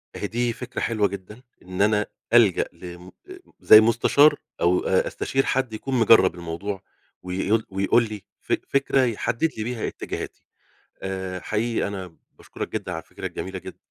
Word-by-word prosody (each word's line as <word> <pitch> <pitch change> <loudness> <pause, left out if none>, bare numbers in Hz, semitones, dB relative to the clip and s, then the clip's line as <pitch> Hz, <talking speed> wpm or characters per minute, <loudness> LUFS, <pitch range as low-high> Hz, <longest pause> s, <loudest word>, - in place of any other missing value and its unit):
أهي 105 - -3
دي 120 +2 -1
فكرة 125 +1 -6
حلوة 110 -3 +1
جدًا 100 +4 -9 0.2
إن 90 +1 -5
أنا 105 0 +3 0.3
ألجأ 110 -7 +5
لم 90 0 -11 0.2
آآ، 370 - -10 0.2
زَيّ 110 - +9
المستشار 115 +7 +5 0.3
أو 90 +1 +3
أ - - +1
أستشير 135 0 -1
حد 130 -4 0
يكون 130 +4 -3
مجرّب 105 -6 +6
الموضوع 90 +4 -5 0.4
ويقول 95 +5 0
ويقول 100 +5 +2
لي 105 -2 -7 0.2
فك - - -1
فكرة 135 0 +2
يحدّد 115 +6 0
لي 110 - -2
بيها 120 0 -3
اتجاهاتي. - - -6 0.6
آآ، 95 -1 -4
حقيقي 115 +3 -1
أنا 95 -4 -7 0.2
باشكرك - - -7
جدًا 100 -4 -3
على 80 - -5
الفكرة - - -8
الجميلة 95 0 -5
جد - - -10
105 Hz, 160 wpm, -24 LUFS, 95-115 Hz, 0.6 s, زَيّ